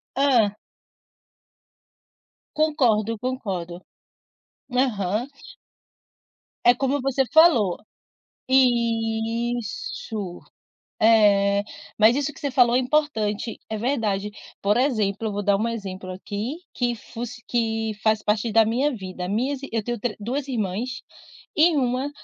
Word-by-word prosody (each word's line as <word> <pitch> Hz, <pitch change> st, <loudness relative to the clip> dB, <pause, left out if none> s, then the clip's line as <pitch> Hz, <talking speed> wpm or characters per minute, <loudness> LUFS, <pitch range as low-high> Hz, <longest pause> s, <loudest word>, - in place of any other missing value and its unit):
Hã. 245 Hz, -7 st, +3 dB, 2.0 s
Concordo, 240 Hz, -8 st, +2 dB
concordo. 195 Hz, -8 st, -4 dB, 0.9 s
Aham. 225 Hz, -3 st, 0 dB, 1.4 s
É 245 Hz, -, +8 dB
como 270 Hz, +2 st, -1 dB
você 270 Hz, 0 st, +1 dB
falou. 295 Hz, -, +5 dB, 0.7 s
Isso, 230 Hz, -, 0 dB, 0.6 s
é 205 Hz, -2 st, +5 dB, 0.4 s
mas 220 Hz, +3 st, +6 dB
isso 290 Hz, +1 st, -1 dB
que -, -, -15 dB
você 285 Hz, -3 st, -2 dB
falou 245 Hz, -2 st, +4 dB
é -, -, +5 dB
importante, 250 Hz, -6 st, 0 dB
é 220 Hz, -, -3 dB
verdade. 210 Hz, -4 st, -1 dB, 0.3 s
Por 205 Hz, +2 st, +2 dB
exemplo 220 Hz, -5 st, 0 dB
vou 205 Hz, 0 st, -3 dB
dar 200 Hz, 0 st, +3 dB
um 225 Hz, +3 st, 0 dB
exemplo 190 Hz, -5 st, -6 dB
aqui, 205 Hz, +7 st, -4 dB, 0.2 s
que 245 Hz, -2 st, -1 dB
fosse 240 Hz, +2 st, -8 dB
que 225 Hz, -2 st, -1 dB
faz 220 Hz, -1 st, +2 dB
parte 210 Hz, +2 st, 0 dB
da 225 Hz, +1 st, +5 dB
minha 245 Hz, +7 st, +1 dB
vida, 185 Hz, -2 st, -6 dB
minhas 255 Hz, +7 st, -1 dB
eu 225 Hz, -1 st, 0 dB
tenho 240 Hz, +1 st, -3 dB
tre 235 Hz, 0 st, -2 dB
2 260 Hz, +7 st, -3 dB
irmãs, 230 Hz, +1 st, -3 dB, 0.5 s
e 320 Hz, +1 st, +5 dB
uma 255 Hz, +1 st, 0 dB
230 Hz, 115 wpm, -24 LUFS, 210-255 Hz, 2.0 s, É